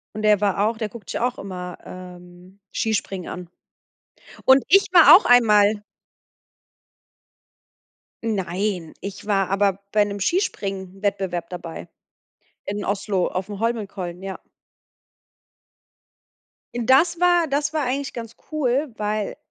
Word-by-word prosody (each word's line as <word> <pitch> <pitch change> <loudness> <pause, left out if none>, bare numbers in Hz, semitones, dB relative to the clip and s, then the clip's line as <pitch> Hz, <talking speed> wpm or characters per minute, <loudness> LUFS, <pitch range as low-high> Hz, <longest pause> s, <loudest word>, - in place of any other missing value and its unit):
Und 215 - -4
der 210 -2 +4
war 205 0 +1
auch 230 - -3
der 220 -1 -3
guckt 220 +1 -11
sich - - -3
auch 245 +1 -1
immer, 180 -2 -7
ähm, 180 +1 -12
Skispringen 195 -4 -2
an. 180 -1 -7 1.0
Und 265 0 +6
ich 390 +4 +6
war 340 -3 +9
auch 390 - +1
einmal 210 -4 +5 2.4
Nein, 190 -4 -2
ich 200 0 -7
war 195 -3 +1
aber 195 0 +1
bei 210 -1 +4
'nem 205 0 -5
Skispringen-Wettbewerb 195 - -2
dabei. 175 -2 -8 0.8
In 205 +1 -4
Oslo 195 -2 -1
aufm 195 +2 -5
Holmenkollen, 200 -6 -3
ja. 195 -1 -6 2.4
Das 265 +9 +3
war 350 -2 +3
das 290 +1 -1
war 310 -1 0
eigentlich 275 +2 -2
ganz 230 -1 -8 0.2
cool, 280 -2 0
weil 210 0 -2
205 Hz, 115 wpm, -22 LUFS, 190-240 Hz, 2.4 s, war